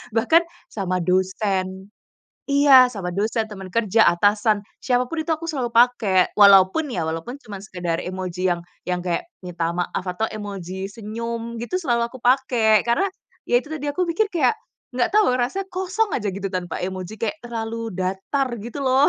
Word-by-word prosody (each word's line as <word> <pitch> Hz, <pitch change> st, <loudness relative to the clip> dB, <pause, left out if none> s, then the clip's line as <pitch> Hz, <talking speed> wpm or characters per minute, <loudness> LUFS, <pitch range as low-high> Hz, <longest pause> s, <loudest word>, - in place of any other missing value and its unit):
bahkan 325 Hz, +9 st, +4 dB, 0.2 s
sama 185 Hz, -3 st, -2 dB
dosen 190 Hz, +1 st, -1 dB, 0.6 s
iya, 275 Hz, -3 st, +6 dB
sama 190 Hz, -4 st, -4 dB
dosen, 215 Hz, +4 st, -1 dB
teman 190 Hz, -3 st, -9 dB
kerja, 225 Hz, -1 st, +3 dB
atasan, 205 Hz, +4 st, +3 dB, 0.2 s
siapa 250 Hz, -1 st, 0 dB
pun 330 Hz, -, -5 dB
itu 315 Hz, +1 st, -1 dB
aku 330 Hz, +1 st, -3 dB
selalu 255 Hz, -7 st, -2 dB
pakai, 230 Hz, -6 st, +4 dB
walaupun 200 Hz, +8 st, +6 dB
ya, 175 Hz, -, -2 dB
walaupun 165 Hz, -, -5 dB
cuma 210 Hz, -5 st, -9 dB
sekadar 175 Hz, -4 st, -3 dB
emoji 185 Hz, 0 st, -2 dB
yang 175 Hz, -, -4 dB, 0.2 s
yang 180 Hz, 0 st, -1 dB
kayak 175 Hz, -, -2 dB, 0.2 s
minta 170 Hz, -2 st, -3 dB
maaf 180 Hz, +1 st, -3 dB
atau 185 Hz, +5 st, -2 dB
emoji 195 Hz, -3 st, -6 dB
senyum 230 Hz, +2 st, -5 dB
gitu, 240 Hz, +11 st, -3 dB
selalu 240 Hz, -7 st, +1 dB
aku 260 Hz, -, -10 dB
pakai. 240 Hz, -4 st, +3 dB
Karena 240 Hz, +12 st, +2 dB, 0.4 s
ya 245 Hz, -, +4 dB
itu 305 Hz, -, -10 dB
tadi, 295 Hz, -2 st, -4 dB
aku 360 Hz, +5 st, 0 dB
mikir 380 Hz, +5 st, 0 dB
kayak 345 Hz, +6 st, +1 dB, 0.3 s
enggak 245 Hz, -1 st, +1 dB
tahu, 420 Hz, -12 st, +5 dB
rasanya 380 Hz, +11 st, -2 dB
kosong 380 Hz, +4 st, -1 dB
aja 210 Hz, -3 st, -1 dB
gitu 195 Hz, 0 st, -4 dB
tanpa 180 Hz, -1 st, -3 dB
emoji, 185 Hz, +2 st, -5 dB
kayak 230 Hz, +9 st, -3 dB
terlalu 230 Hz, -1 st, -4 dB
datar 195 Hz, +9 st, -1 dB
gitu 240 Hz, +5 st, -6 dB
loh. 265 Hz, +3 st, +4 dB
220 Hz, 165 wpm, -22 LUFS, 185-260 Hz, 0.6 s, iya